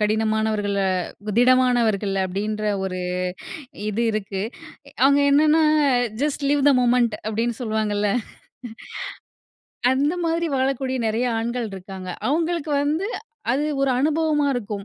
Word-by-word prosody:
கடினமானவர்களு 215 -2 0 0.5
திடமானவர்கள் 240 -5 +3
அப்பிடின்ற 205 +3 -3 0.2
ஒரு 185 -1 -3 0.9
இது 215 +2 -1
இருக்கு. 200 -2 -3 0.6
அவுங்க 280 +1 +5
என்னன்னா 305 +2 +5 0.6
ஜஸ்ட் 290 -1 -1
லிவ் 290 0 +2
தெ - - +7
மொமெண்ட் 240 -2 +3
அப்பிடின்னு 225 +2 -1
சொல்லுவாங்க. 215 -2 -1 2.0
அந்த 285 +5 +1
மாதிரி 335 +1 0
வாழக்கூடிய 260 0 0
நிறைய 220 +3 0
ஆண்கள் 235 +1 -2
இருக்காங்க. 190 -1 -8 0.2
அவுங்களுக்கு 320 +1 0
வந்து, 310 +7 0 0.5
அது 280 +4 0 0.2
ஒரு 275 -1 +2
அனுபவமா 305 0 +1
இருக்கும். 210 -4 -4
240 Hz, 105 wpm, -23 LUFS, 215-285 Hz, 2.0 s, தெ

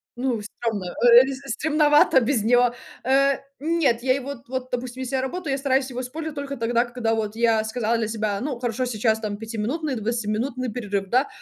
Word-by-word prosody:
ну 245 -2 -1
стремно, 210 -1 -4
э, 235 +6 +5
э, 275 +1 -6
стремновато 295 -3 +4
без 235 -2 +1
него. 245 +1 +4 0.3
Э, 275 +2 +3 0.2
нет 295 -6 +1
я 255 0 +3
его 275 0 -4
вот 250 0 -20
вот 255 -1 -4
допустим 250 +1 -4
если 260 +1 -3
я 260 - +1
работаю 295 +4 -3
я - - 0
стараюсь 270 -1 +1
его 250 -1 -5
использовать 305 +5 -6
только 280 -1 -4
тогда 235 +1 +1
когда 240 -2 -1
вот 215 -1 -3
я 225 -1 +2
сказала 230 0 0
для 225 -1 -1
себя, 215 -2 -2
ну, 260 0 -3
хорошо 245 +1 -1
сейчас 220 -2 0
там 210 -2 -4
пятиминутный 230 +8 -3
или 240 - -3
двадцатиминутный 235 +3 -2
перерыв, 205 -4 -3
да. 255 +5 +3
245 Hz, 200 wpm, -24 LUFS, 225-270 Hz, 0.3 s, э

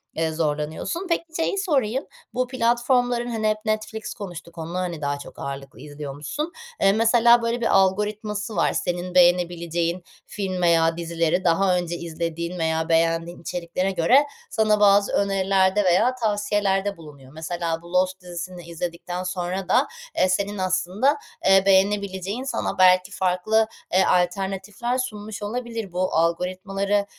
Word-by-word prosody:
eee, 160 0 0
zorlanıyorsun. 155 - -2
Peki, 335 - +1
şeyi 330 +4 0
sorayım, 270 - 0 0.3
bu 255 0 0
platformların, 245 0 +1
hani, 220 -2 -1
hep 215 - +1
Netflix 215 0 -3
konuştuk, 175 -4 -9
onu, 165 +2 -6
hani, 175 -4 -3
daha 145 0 -2
çok - - -11
ağırlıklı 135 -1 -7
izliyormuşsun. 145 - -5 0.3
Eee, 195 - +5
mesela, 235 +2 +5
böyle, 230 +1 -1
bir 230 - +2
algoritması 210 +2 0
var. - - +2
Senin 175 +1 -3
beğenebileceğin 175 -1 +2 0.2
film 190 -3 -4
veya 165 -1 +3
dizileri 170 +1 0
daha 180 +2 +3
önce 175 -1 -2
izlediğin 170 +1 -4
veya 160 0 0
beğendiğin 165 +1 +1
içeriklere 180 +2 -2
göre 195 - +4 0.3
sana 215 -1 +2
bazı 200 0 +5
önerilerde 195 0 +2
veya 190 +8 +3
tavsiyelerde 205 -3 0
bulunuyor. 145 -5 -13
Mesela 165 +1 -3
bu 170 +1 -13
Lost 185 +1 +1
dizisini 175 0 -7
izledikten 170 +1 -5
sonra 185 +1 -3
da, 260 +4 +4 0.3
eee, 185 - +3
senin 200 +2 -1
aslında, 185 +9 +1 0.3
eee, 195 0 +6
beğenebileceğin 195 +2 +1
sana 265 -6 -2
belki 185 0 +5
farklı, 195 +4 +1 0.3
eee, 185 - +5
alternatifler 195 +6 0
sunmuş 215 -4 -5
olabilir. 230 -2 -4
Bu 185 +1 -1
algoritmaları 185 +4 0
185 Hz, 135 wpm, -23 LUFS, 170-210 Hz, 0.3 s, eee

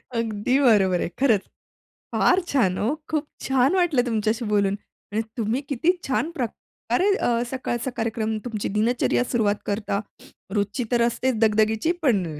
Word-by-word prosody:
अगदी 230 +3 0
बरोबर 190 -6 +4
आहे. - - -1
खरंच. 225 -8 +4 0.7
फार 365 - +4
छान 195 -10 +2
ओ, - - +1 0.2
खूप 305 -2 -1 0.2
छान 265 +5 +3
वाटलं 330 -9 +3
तुमच्याशी 220 0 0
बोलून. 200 -1 +2 0.4
आणि 220 +2 0 0.2
तुम्ही 230 +4 0
किती 285 +6 +2 0.2
छान 275 +4 0
प्रकारे 250 - -2
अ, 235 -1 +1
सकाळचा 255 -1 -3
कार्यक्रम 220 -1 -1
तुमची 220 -4 -3
दिनचर्या 240 +2 +2
सुरुवात 220 -4 +1
करता, 205 -1 -1 0.6
रोजची 205 +4 0
तर 240 -1 +3
असतेच 255 +1 0
दगदगीची 220 +6 +2
पण 215 - +2
230 Hz, 140 wpm, -24 LUFS, 210-260 Hz, 0.7 s, बरोबर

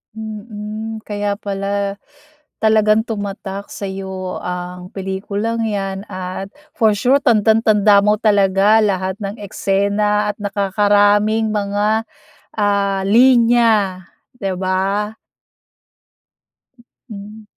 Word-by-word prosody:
Mhm, 215 0 -7
kaya 205 -1 -2
pala 200 0 -3 0.6
talagang 215 0 +3
tumatak 200 -2 -5
sa'yo 190 -1 -5
ang 180 0 -6
pelikulang 200 +4 -3
'yan 195 -1 -3
at 185 +1 -5 0.2
for 220 -2 +3
sure 260 +6 +3
tandang-tanda 215 -3 +4
mo 210 +1 +3
talaga 205 0 +4
lahat 190 -2 0
ng 200 +1 -4
eksena 205 +1 0
at - - -38
nakakaraming 205 +2 +2
mga 210 +2 0 0.5
ah 200 -1 +1
linya, 230 -5 +4 0.3
'di 195 -4 -3
ba. 195 +3 -1 1.9
Mhm. 210 +1 -10
205 Hz, 90 wpm, -18 LUFS, 195-215 Hz, 1.9 s, tandang-tanda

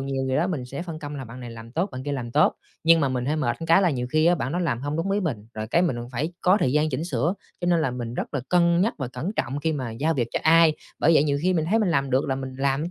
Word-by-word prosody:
nhiều 135 -1 -2
gì 130 - 0
đó 175 - +2
mình 155 -9 -3
sẽ 140 +5 -6
phân 165 -3 -6
công 145 -1 -6
là 135 - -6
bạn 120 +2 -10
này 120 - -7
làm 115 0 -10
tốt, 180 +6 -1
bạn 130 0 -6
kia 145 - -2
làm 120 -4 -4
tốt, 150 +5 +3 0.3
nhưng 165 0 +6
mà 140 - +2
mình 125 -1 -2
hơi 150 +3 0
mệt 120 -6 0
cái 165 +4 +5
là 180 - +3
nhiều 125 -3 -2
khi 155 +2 +3
bạn 130 +3 -2
đó 175 - -1
làm 125 -9 -1
hông 145 +2 -3
đúng 190 +4 -1
ý 205 - +1
mình, 125 - -3
rồi 110 0 -4
cái 170 +9 +2
mình 165 -9 0 0.2
phải 150 +8 -2
có 185 +3 +4
thời 130 -5 +2
gian 150 +1 +2
chỉnh 145 +5 -2
sửa 155 +4 0 0.3
cho 175 - -2
nên 170 -2 +3
là 135 - 0
mình 120 -1 -5
rất 145 - -4
là 135 - 0
cân 170 -1 +3
nhắc 220 +5 +1
và 130 -3 -3
cẩn 130 +10 -4
trọng 135 +4 -1
khi 160 +1 0
mà 130 -5 -3
giao 150 +9 0
việc 120 -4 -1
cho - - +1
ai. 165 0 +6 0.3
Bởi 165 - +4
vậy 150 - +5
nhiều 140 -1 +1
khi 185 +1 +2
mình 160 - +1
thấy 225 - +4
mình 205 -5 +1
làm 140 -4 +1
được 130 +2 +2
là 135 - +1
mình 130 -1 -6
làm 140 +5 0
145 Hz, 325 wpm, -24 LUFS, 130-165 Hz, 0.3 s, nhưng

